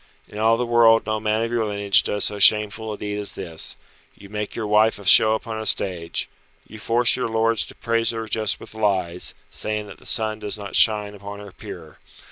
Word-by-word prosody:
In 105 - -9
all 115 +1 +3
the 125 - -1
world 115 -1 +4
no 110 0 -2
man 110 +1 0
of 115 - -3
your 120 -1 0
lineage 100 -2 +2
does 105 -1 -2
so 105 -1 -3
shameful 105 +2 +4
a 105 - -6
deed 105 0 -4
as 105 - -4
this. 80 -2 -3 0.4
You 100 - -15
make 105 0 -5
your 110 - -3
wife 105 +1 +3
a 100 - -12
show 110 +3 +6
upon 110 -1 -5
a - - -6
stage. 85 -4 -1 0.4
You 110 - -12
force 115 +3 +2
your 125 - -2
lords 115 0 0
to - - -12
praise 115 -1 -1
her 115 -1 -4
just 110 -1 -1
with - - -12
lies, 95 -5 -1 0.2
saying 105 0 -3
that 100 - -12
the - - -16
sun 110 -1 -1
does 105 0 -4
not 100 -1 -7
shine 105 -2 +3
upon 100 0 -9
her 100 -1 -11
peer. - - -11
105 Hz, 220 wpm, -22 LUFS, 100-110 Hz, 0.4 s, show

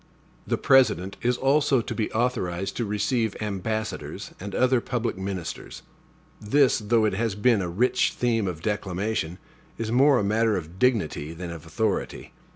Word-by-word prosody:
The - - 0
President 100 -8 +3
is 125 +1 +1
also 140 0 +3
to - - -5
be 110 - -2
authorized 100 -6 -1
to 120 - -1
receive 105 +2 0
ambassadors 110 +1 -4
and 100 +1 -6
other 130 -1 +3
public 120 -1 -2
ministers. 95 -3 -6 0.6
This, 130 +6 +3
though 110 +1 +2
it 105 - +1
has 110 0 -1
been 105 0 +3
a 90 - -3
rich 115 +9 +1
theme 115 -4 0
of 85 -3 -5
declamation, 100 -3 -2 0.4
is 115 -1 -3
more 135 +3 +5
a - - +1
matter 110 +1 +2
of 85 +1 -8
dignity 95 - +1
than 85 +1 -6
of 85 -1 -9
authority. 110 +3 -2
110 Hz, 160 wpm, -25 LUFS, 95-120 Hz, 0.6 s, more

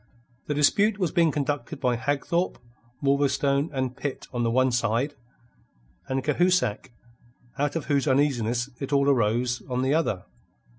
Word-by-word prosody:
The 150 - -1
dispute 200 +9 +3
was 180 -6 0
being 170 -3 +3
conducted 145 0 -3
by 125 -3 +1
Hagthorpe, 145 +8 -1 0.5
Wolverstone, 140 +1 +2
and 130 -2 -2
Pitt 145 -2 -5
on 120 - -1
the 115 - +1
one 130 +2 +2
side, 120 +4 0 0.9
and 130 0 -1
Cahusac, 150 - +1 0.7
out 145 +2 0
of 165 - -2
whose 140 0 +1
uneasiness 130 -3 +1
it 135 0 -5
all 140 -1 +3
arose, 120 -1 +1
on 125 0 -1
the 135 +2 +2
other. 130 - 0
140 Hz, 145 wpm, -26 LUFS, 125-145 Hz, 0.9 s, dispute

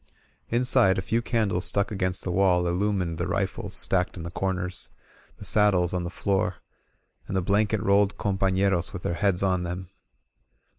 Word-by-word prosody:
Inside, 120 -4 +2
a - - 0
few 115 +5 0
candles 110 -6 -1
stuck 100 +1 0
against 95 -2 -2
the 90 - -3
wall 90 -1 +2
illumined 90 -2 -1
the 85 - -2
rifles 95 0 0
stacked 90 0 +4
in 85 - -7
the 85 - -7
comers, 90 -1 -3 0.5
the - - -10
sad 105 -2 +4
dles 90 0 0
on 90 -1 -2
the 85 - -4
floor, 95 -1 -1 0.7
and 95 - -2
the - - +1
blanket 105 +2 +1
rolled 100 0 +2
companeros 95 -2 0
with 95 - -7
their - - -1
heads 100 0 0
on 95 -2 +1
them. 90 +1 -6
95 Hz, 175 wpm, -25 LUFS, 90-100 Hz, 0.7 s, stacked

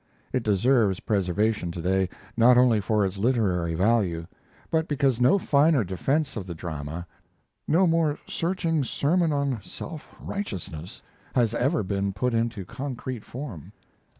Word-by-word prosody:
It 130 - +1
deserves 110 -1 +2
preservation 100 0 0
to 85 - -6
day, 95 +2 +1 0.3
not 120 +1 +6
only 120 -4 +5
for 105 +1 +1
its 95 +1 -4
literary 95 -8 +1
value, 95 -4 +1 0.5
but 160 0 +1
because 135 -4 +1
no 150 +11 +5
finer 145 - +3
defense 135 - -1
of 100 -4 -5
the 85 - -5
drama, 80 0 -5 0.6
no 180 +5 +4
more 165 -3 +2
searching 165 -3 -1
sermon 160 +6 +1
on 140 -5 0
self 160 +7 -9
righteousness, 90 - -6 0.3
has 115 -3 +3
ever 135 +4 +1
been 100 +1 -1
put 125 +6 -1
into 115 -4 -1
concrete 130 0 -5
form. 120 - -8
115 Hz, 140 wpm, -26 LUFS, 95-140 Hz, 0.6 s, not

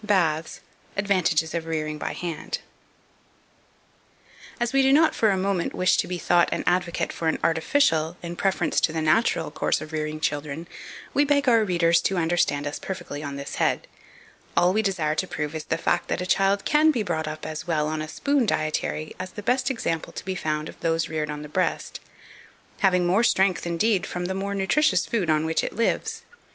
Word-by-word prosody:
Baths. 165 -7 +1 0.4
Advantages 185 -5 +1
of 165 -1 -3
Rearing 155 -1 -2
by - - -3
Hand. 170 -3 -6 2.1
2497. - - +1
As 240 +2 -2
we 275 - +5
do 270 0 +4
not 310 +3 +5
for 220 - +2
a 195 - +2
moment 190 -2 -1
wish 185 0 +3
to - - 0
be 180 - -3
thought 175 0 +3
an - - -1
advocate 175 -1 0
for 165 - -3
an 160 - +1
artificial, 165 - +2
in 170 0 -5
preference 195 +2 +1
to - - +2
the 160 - -2
natural 160 +9 +2
course - - 0
of 155 - -8
rearing 155 0 -3
children, 150 +1 -3 0.5
we 285 - +4
beg 285 -1 +2
our 230 -3 +5
renders 170 -3 +3
to 195 - 0
understand 165 -4 +1
us 145 - -4
perfectly 160 -6 -6
on 140 -2 -5
this 140 0 -6
head; - - +1 0.7
all 180 +1 +4
we 215 - +2
desire 185 -7 0
to 185 +4 -1
prove 150 -2 -4
is 155 -1 -5
the 165 - -1
fact 175 +1 0
that - - -1
a 180 - -2
child 195 +2 +2
can 305 +1 +4
be 245 -8 +1
brought 160 -5 -2
up 155 0 -6
as 155 +2 -6
well 155 -3 +1
on 155 0 -2
a 155 - -4
spoon 280 - 0
dietary 155 -2 -1
as 185 0 -6
the 210 - -7
best 250 +3 +1
example 165 -10 -2
to - - -8
be 190 - -2
found 155 -3 -2
of - - -11
those 165 -1 0
reared 155 -1 -2
on 150 0 -5
the - - -7
breast; 180 +5 -2 0.8
having 180 -2 +3
more 190 +6 +3
strength, 190 -6 +2
indeed, 185 +4 +1
from 180 0 -4
the 190 - -2
more 200 +1 -3
nutritious 250 +11 +2
food 205 -9 -1
on 155 0 +2
which 160 0 0
it - - -3
lives. 230 +2 -1
175 Hz, 205 wpm, -25 LUFS, 155-200 Hz, 2.1 s, we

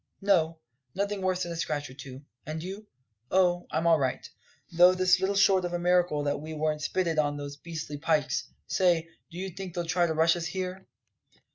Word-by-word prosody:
"No; 165 -5 +2 0.4
nothing 200 +1 -1
worse 185 -1 0
than 175 - -5
a - - -4
scratch 150 -3 -2
or 130 - -12
two. 130 +1 -10 0.2
And 155 +2 -5
you?" 195 +4 -7 0.4
"Oh, 180 -1 +2
I'm 160 - -1
all 165 -2 +5
right. 130 -2 -2 0.4
Though 175 +1 +7
it's 185 0 +3
little 190 +1 0
short 195 -2 +4
of 175 0 -3
a - - +1
miracle 175 -4 +2
that 145 0 -1
we 155 +1 -7
weren't 155 0 -1
spitted 165 0 0
on 145 -1 +1
those 145 0 -6
beastly 155 -2 -6
pikes. 150 - 0 0.2
Say, 170 - +2 0.2
do 170 - -11
you 190 +1 -4
think 185 -1 -8
they'll 175 -1 -2
try 175 +1 +2
to 160 - -1
rush 165 +2 +4
us 170 -1 -3
here?" 185 +1 -5
170 Hz, 205 wpm, -28 LUFS, 155-185 Hz, 0.4 s, Though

